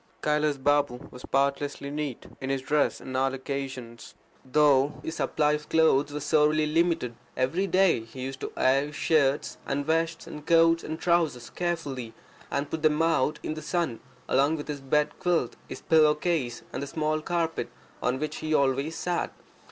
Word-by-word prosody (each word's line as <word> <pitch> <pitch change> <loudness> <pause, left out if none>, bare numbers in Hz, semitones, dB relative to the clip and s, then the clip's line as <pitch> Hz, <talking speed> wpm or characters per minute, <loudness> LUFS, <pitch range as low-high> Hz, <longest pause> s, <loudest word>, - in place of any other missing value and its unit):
Kailas 150 -1 +1
Balm 140 -2 +1
was 125 - -11
spotlessly 140 +1 -1
neat 145 -4 -4 0.2
in 130 - -3
his 135 -1 -1
dress 150 +1 +1
on 130 - -7
all 135 +1 +1
occasions, 130 -4 -6 0.3
though 140 +1 +3
his 160 - -5
supply 150 -1 +1
of 150 0 -3
clothes 155 -3 +3
was 150 0 -4
sorely 150 +1 +3
limited. 165 -5 +1 0.2
Every 165 +10 +1
day 185 -6 +4
he 115 +3 -10
used 130 +1 -5
to - - -5
air 135 +2 +3
his 150 - -10
shirts 145 -3 +1
and 140 +1 -2
vests 165 +1 0
and 150 - -9
coats 165 +1 +4
and 160 +1 -5
trousers 165 -9 +1
carefully, 145 -9 -3 0.3
and 140 +1 -2
put 160 - -3
them 155 -1 +3
out 155 -2 +1
in - - -2
the 155 - -7
sun, 160 -7 -1 0.3
along 140 +4 +3
with 145 - -6
his 145 -2 -4
bed 150 +2 0
quilt, 175 -2 0
his - - -7
pillowcase, 150 -5 +2
and - - -3
the 140 - -4
small 155 +1 -1
carpet 165 0 -1 0.3
on 125 +1 0
which 155 +3 -3
he 155 0 -1
always 140 +3 +1
sat. 175 +1 -2
150 Hz, 175 wpm, -27 LUFS, 135-160 Hz, 0.3 s, day